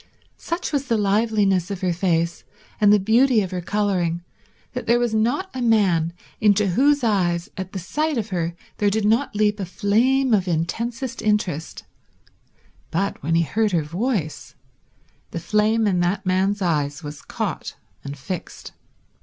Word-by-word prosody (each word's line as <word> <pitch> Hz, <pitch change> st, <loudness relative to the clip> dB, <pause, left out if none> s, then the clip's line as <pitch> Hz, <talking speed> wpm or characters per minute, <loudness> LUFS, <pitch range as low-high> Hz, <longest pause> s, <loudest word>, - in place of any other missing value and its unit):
Such 335 Hz, -1 st, -4 dB
was 280 Hz, -1 st, 0 dB
the 230 Hz, -3 st, +2 dB
liveliness 205 Hz, -3 st, +2 dB
of 200 Hz, -2 st, -5 dB
her 180 Hz, -2 st, +1 dB
face 170 Hz, -1 st, 0 dB, 0.4 s
and 205 Hz, -1 st, +6 dB
the 210 Hz, -, +7 dB
beauty 225 Hz, +3 st, +3 dB
of 185 Hz, -, -6 dB
her 180 Hz, -1 st, -3 dB
colouring 175 Hz, -3 st, 0 dB, 0.5 s
that -, -, -5 dB
there 235 Hz, +1 st, +4 dB
was 240 Hz, -2 st, 0 dB
not 250 Hz, +13 st, 0 dB
a 260 Hz, -, -4 dB
man 195 Hz, -8 st, +3 dB, 0.3 s
into 210 Hz, -1 st, +3 dB
whose 280 Hz, +8 st, +3 dB
eyes 175 Hz, -6 st, +1 dB
at 190 Hz, -1 st, -6 dB
the 200 Hz, -, -5 dB
sight 300 Hz, -, -1 dB
of 225 Hz, -1 st, -2 dB
her 170 Hz, -2 st, -2 dB, 0.2 s
there 205 Hz, -, +2 dB
did 210 Hz, +1 st, 0 dB
not 225 Hz, +3 st, +2 dB
leap 210 Hz, 0 st, +2 dB
a -, -, -2 dB
flame 230 Hz, +9 st, +2 dB
of 195 Hz, -3 st, +2 dB
intensest 230 Hz, +10 st, -2 dB
interest; 205 Hz, -7 st, -1 dB, 1.1 s
but, 195 Hz, +4 st, -2 dB
when 165 Hz, +4 st, 0 dB
he 170 Hz, -, +4 dB
heard 215 Hz, +4 st, 0 dB
her 165 Hz, -3 st, +2 dB
voice, 165 Hz, -, -3 dB, 0.7 s
the 170 Hz, -, -4 dB
flame 215 Hz, +5 st, +2 dB
in 190 Hz, -4 st, +2 dB
that 175 Hz, +3 st, 0 dB
man's 190 Hz, +2 st, +1 dB
eyes 145 Hz, -4 st, -1 dB
was 145 Hz, 0 st, -7 dB
caught -, -, -4 dB, 0.3 s
and 140 Hz, +1 st, -6 dB
fixed. 180 Hz, +6 st, -7 dB
200 Hz, 160 wpm, -22 LUFS, 175-225 Hz, 1.1 s, the